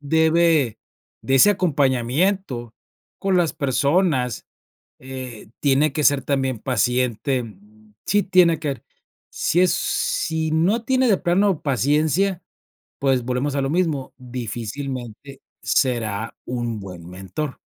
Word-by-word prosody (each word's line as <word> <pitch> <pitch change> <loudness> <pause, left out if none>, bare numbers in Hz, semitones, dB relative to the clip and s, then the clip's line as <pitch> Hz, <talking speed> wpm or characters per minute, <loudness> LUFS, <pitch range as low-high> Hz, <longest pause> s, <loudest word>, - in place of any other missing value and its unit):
debe 160 -3 +2 0.4
de 135 - 0
ese 170 +10 +7
acompañamiento 140 - 0 0.5
con 195 -1 +1
las 170 -3 +2
personas, 140 - +1 0.5
eh, 130 -5 -9
tiene 140 +1 +3
que 150 - -1
ser 140 -1 +4
también 135 -3 -1
paciente, 125 +2 0 0.6
sí 205 0 +2
tiene 180 -4 +4
quer 145 -4 -4 0.5
sí 175 - +1
es 185 -1 +4
sí 160 -1 -1
no 175 +9 +2
tiene 260 +1 +2
de 200 -5 +3
plano 185 0 +1
paciencia, 155 +7 +1 0.6
pues, 135 -3 +1
volvemos 130 +3 -1
a 140 - 0
lo 135 - -1
mismo, 160 -6 -1
difícilmente 125 +1 -6 0.2
será 115 -4 0
un 120 -3 -3
buen 90 -3 -9
mentor. 95 - -6
140 Hz, 115 wpm, -22 LUFS, 125-165 Hz, 0.6 s, ese